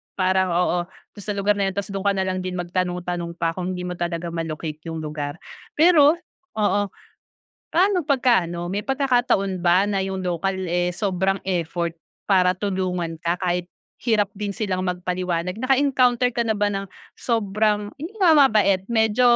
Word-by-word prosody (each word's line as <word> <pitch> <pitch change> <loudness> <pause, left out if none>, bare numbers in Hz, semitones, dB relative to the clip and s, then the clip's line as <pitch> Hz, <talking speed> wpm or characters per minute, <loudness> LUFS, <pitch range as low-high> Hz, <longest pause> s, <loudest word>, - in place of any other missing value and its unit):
parang, 185 0 +2
oo, 180 0 +2
dun 195 +2 -16
sa 210 - -2
lugar 200 +1 +2
na 195 -1 +1
yun. 190 - -6
Tapos 200 0 -3
dun 195 0 -4
ka 200 - +4
nalang 190 -1 -1
din 185 0 -4
magtanong-tanong 175 -1 -3
pa 165 - 0
kung 185 +1 -3
hindi 180 - -5
mo 180 0 -3
talaga 170 0 -3
ma-locate 160 -2 -4
yung 160 -1 -4
lugar. 150 -1 -4 0.4
Pero 310 -2 +6 0.4
oo. 205 -1 +2 0.9
Paano 370 +2 +3
pagka 250 - +2
ano, 170 0 -4
may 195 +4 -2
pagkakataon 245 -9 +1
ba 180 +3 +4
na 200 -2 0
yung 190 -1 -3
local 180 +2 -1
eh, 175 0 0
sobrang 190 +1 0
effort 170 -2 -1 0.3
para 185 -2 +3
tulungan 185 -4 -2
ka 170 +1 0
kahit 180 -1 -1 0.3
hirap 220 -4 +2
din 205 0 -4
silang 195 -2 -2
magpaliwanag? 180 -1 -2
Naka-encounter 255 0 +2
ka 235 - 0
na 220 -2 0
ba 205 - +2
ng 195 0 -4 0.2
sobrang, 210 -2 0
yun 345 +8 -6
nga, 360 -5 +5
mabait, 215 -10 +4
medyo 220 0 +2
190 Hz, 165 wpm, -23 LUFS, 180-215 Hz, 0.9 s, Pero